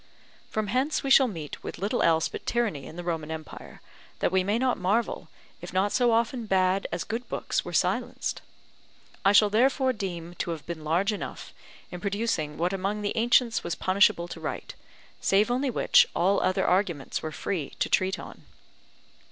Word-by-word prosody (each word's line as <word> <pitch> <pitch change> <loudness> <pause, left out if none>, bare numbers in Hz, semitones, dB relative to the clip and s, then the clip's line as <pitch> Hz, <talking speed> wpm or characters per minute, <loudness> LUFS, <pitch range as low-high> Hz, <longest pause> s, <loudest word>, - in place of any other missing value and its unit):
From 215 -1 -1
hence 260 +10 0
we 275 - -1
shall 265 -1 +7
meet 160 -9 -7
with - - -6
little 205 +6 -1
else 160 -1 +3
but - - -9
tyranny 225 -12 -1
in - - -10
the 175 - -6
Roman 165 -3 -3
empire, 160 -1 -8 0.4
that - - 0
we 190 0 +2
may 205 +4 +1
not 255 0 +1
marvel, 205 +6 0 0.3
if - - -8
not 190 +2 +2
so 245 -2 +3
often 230 +1 0
bad 190 0 +2
as - - -2
good 235 +2 -5
books - - -1
were - - -7
silenced. - - -1 0.8
I 195 - +5
shall 205 0 +5
therefore 260 +3 +3
deem 175 -5 -5
to - - -2
have 165 -3 -5
been 170 -2 -6
large 175 +7 +1
enough, 205 - -7 0.4
in 180 - -7
producing 200 -8 -1
what 175 +3 0
among 200 +2 -2
the 205 - -2
ancients 235 0 +3
was 170 - -2
punishable 185 -2 +3
to - - -7
write; - - -5 0.5
save 205 +5 +2
only 260 +2 0
which, 240 - +4
all 195 +3 +2
other 185 +1 +1
arguments 180 -7 0
were 155 - -4
free 165 -2 -4
to - - 0
treat 190 0 +1
on. - - -10
195 Hz, 185 wpm, -27 LUFS, 175-230 Hz, 0.8 s, shall